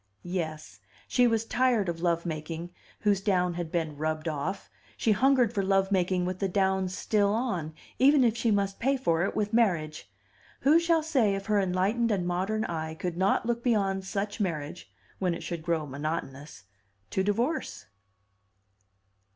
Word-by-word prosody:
Yes; 155 Hz, -, -5 dB, 0.3 s
she 245 Hz, -1 st, +3 dB
was 225 Hz, -1 st, +1 dB
tired 240 Hz, -4 st, +2 dB
of 170 Hz, -1 st, -3 dB
love 170 Hz, -1 st, +1 dB
making 165 Hz, +1 st, -5 dB, 0.3 s
whose 205 Hz, -2 st, +2 dB
down 180 Hz, -3 st, +1 dB
had 170 Hz, -2 st, -5 dB
been 160 Hz, -3 st, -2 dB
rubbed 155 Hz, +1 st, -2 dB
off; 160 Hz, +6 st, -3 dB, 0.3 s
she 225 Hz, -, +2 dB
hungered 250 Hz, +1 st, +3 dB
for 200 Hz, -, 0 dB
love 195 Hz, 0 st, +1 dB
making 185 Hz, -1 st, +1 dB
with 185 Hz, 0 st, -3 dB
the 195 Hz, -, 0 dB
down 190 Hz, 0 st, +1 dB
still 200 Hz, +2 st, +1 dB
on, 200 Hz, -10 st, -2 dB, 0.2 s
even 275 Hz, +1 st, +6 dB
if 230 Hz, -2 st, +3 dB
she 235 Hz, 0 st, 0 dB
must 200 Hz, -2 st, 0 dB
pay 270 Hz, +3 st, +1 dB
for 170 Hz, -10 st, +1 dB
it -, -, -3 dB
with 210 Hz, 0 st, -1 dB
marriage. 160 Hz, -, 0 dB, 0.5 s
Who 300 Hz, +5 st, +5 dB
shall 335 Hz, -2 st, +2 dB
say 255 Hz, -11 st, +2 dB
if 195 Hz, 0 st, -5 dB
her 210 Hz, -1 st, +2 dB
enlightened 195 Hz, +5 st, +1 dB
and 195 Hz, -5 st, 0 dB
modern 190 Hz, +5 st, -1 dB
eye 160 Hz, -1 st, -4 dB
could 175 Hz, +1 st, -4 dB
not 190 Hz, +4 st, +1 dB
look 235 Hz, 0 st, -1 dB
beyond 195 Hz, -5 st, +1 dB
such 205 Hz, +2 st, -3 dB
marriage 170 Hz, -4 st, -4 dB, 0.3 s
(when 180 Hz, -3 st, 0 dB
it -, -, -8 dB
should 170 Hz, -2 st, -4 dB
grow 165 Hz, -2 st, -1 dB
monotonous) 145 Hz, -, -5 dB, 0.5 s
to 190 Hz, -, +1 dB
divorce? 230 Hz, +11 st, -1 dB
190 Hz, 165 wpm, -28 LUFS, 170-220 Hz, 0.5 s, even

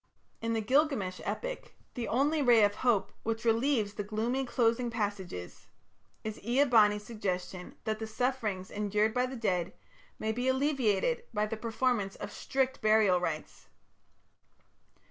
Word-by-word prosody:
In 230 Hz, 0 st, -1 dB
the 225 Hz, -, 0 dB
Gilgamesh 255 Hz, -7 st, +1 dB
epic -, -, -4 dB, 0.2 s
the 240 Hz, -3 st, -3 dB
only 290 Hz, +7 st, +2 dB
ray 240 Hz, -5 st, +6 dB
of 205 Hz, 0 st, +4 dB
hope 230 Hz, -2 st, +1 dB
which 225 Hz, +1 st, -3 dB
relieves 225 Hz, -2 st, +2 dB
the 205 Hz, -, -4 dB
gloomy 230 Hz, +6 st, -1 dB
closing 240 Hz, 0 st, +1 dB
passages 200 Hz, -, -4 dB, 0.6 s
is 215 Hz, -1 st, -5 dB
Ea 245 Hz, +6 st, +3 dB
bani's 210 Hz, -6 st, +4 dB
suggestion 185 Hz, -5 st, -4 dB
that 215 Hz, -1 st, -2 dB
the 220 Hz, -, -4 dB
sufferings 220 Hz, -5 st, -2 dB
endured 210 Hz, +1 st, +1 dB
by 250 Hz, +1 st, +1 dB
the 260 Hz, -, -6 dB
dead 185 Hz, -6 st, -1 dB, 0.4 s
may 220 Hz, -, -1 dB
be 245 Hz, +3 st, -2 dB
alleviated 275 Hz, -, +1 dB
by 210 Hz, 0 st, +2 dB
the 220 Hz, +1 st, -3 dB
performance 225 Hz, -2 st, -1 dB
of -, -, -7 dB
strict 265 Hz, -1 st, -1 dB
burial 215 Hz, -4 st, +4 dB
rites. 165 Hz, -3 st, -4 dB
225 Hz, 145 wpm, -31 LUFS, 205-255 Hz, 0.6 s, ray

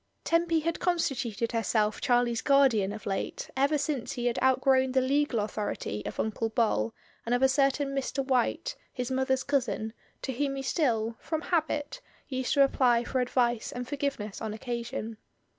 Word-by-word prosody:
Tempy 335 Hz, -1 st, +2 dB
had 335 Hz, +1 st, -2 dB
constituted 255 Hz, -, 0 dB
herself 220 Hz, -2 st, +1 dB
Charlie's 240 Hz, -2 st, +2 dB
guardian 265 Hz, -9 st, +4 dB
of 215 Hz, +1 st, -8 dB
late 195 Hz, -1 st, -3 dB
ever 280 Hz, +3 st, +3 dB
since 285 Hz, -4 st, -2 dB
he 240 Hz, -, -4 dB
had 240 Hz, -1 st, 0 dB
outgrown 260 Hz, 0 st, +3 dB
the 260 Hz, -, +4 dB
legal 275 Hz, -1 st, +1 dB
authority 205 Hz, -, -3 dB
of -, -, -6 dB
Uncle 220 Hz, +1 st, -1 dB
Bol 215 Hz, -, +1 dB, 0.3 s
and 240 Hz, +1 st, +1 dB
of 245 Hz, -, +1 dB
a -, -, +8 dB
certain 275 Hz, +1 st, +2 dB
Mr. 275 Hz, 0 st, -2 dB
White, 255 Hz, -3 st, 0 dB, 0.2 s
his 250 Hz, 0 st, -4 dB
mother's 265 Hz, 0 st, +1 dB
cousin, 245 Hz, -5 st, -1 dB, 0.3 s
to 265 Hz, -, -2 dB
whom 275 Hz, +2 st, -1 dB
he 270 Hz, -, -4 dB
still, 230 Hz, -6 st, 0 dB
from 315 Hz, -1 st, -3 dB
habit, 310 Hz, -4 st, -1 dB, 0.3 s
used 260 Hz, -2 st, -1 dB
to 280 Hz, -, +7 dB
apply 245 Hz, -3 st, +3 dB
for 255 Hz, +1 st, -1 dB
advice 240 Hz, -2 st, +1 dB
and 245 Hz, 0 st, -5 dB
forgiveness 275 Hz, -8 st, -3 dB
on 215 Hz, -1 st, -3 dB
occasion. 235 Hz, -1 st, -4 dB
255 Hz, 165 wpm, -29 LUFS, 230-275 Hz, 0.3 s, a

